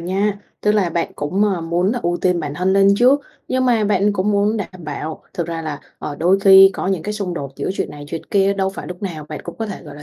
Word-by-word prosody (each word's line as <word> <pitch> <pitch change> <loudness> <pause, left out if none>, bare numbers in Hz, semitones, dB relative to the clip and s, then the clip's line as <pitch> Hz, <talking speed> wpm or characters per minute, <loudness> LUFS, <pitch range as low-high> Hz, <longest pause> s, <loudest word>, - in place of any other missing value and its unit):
nha, 195 +4 -1 0.2
tức 210 - +2
là 200 -5 +1
bạn 170 0 -2
cũng, 185 +8 0
ờ, 195 -4 0
muốn 175 +5 0
là 245 - -2
ưu 175 0 0
tiên 180 -2 +2
bản 145 -2 -4
thân 185 +4 +1
lên 195 0 +5
trước, 255 +6 +4 0.3
nhưng 255 0 +1
mà 235 -4 +3
bạn 205 0 +2
cũng 200 +1 0
muốn 205 +2 +2
đảm 185 -4 -6
bảo 155 +1 -5
thực 170 - -2
ra 165 -1 -4
là, 150 -2 -5 0.2
ờ, 145 - -5
đôi 180 +5 +3
khi 195 0 +8
có - - -3
những 190 -4 0
cái 210 - -3
xung 195 -4 -3
đột 140 -4 -5
giữa - - -2
chuyện - - -3
này 145 0 -9
chuyện 165 +1 -5
kia 195 0 +3
đâu 190 -1 0
phải 195 - -8
lúc 180 +1 -8
nào 160 -6 -5
bạn 155 - -6
cũng 170 - -8
có 225 - -2
thể, 205 - -7
gọi 150 -4 -11
là, 150 - -11
190 Hz, 280 wpm, -19 LUFS, 165-205 Hz, 0.3 s, khi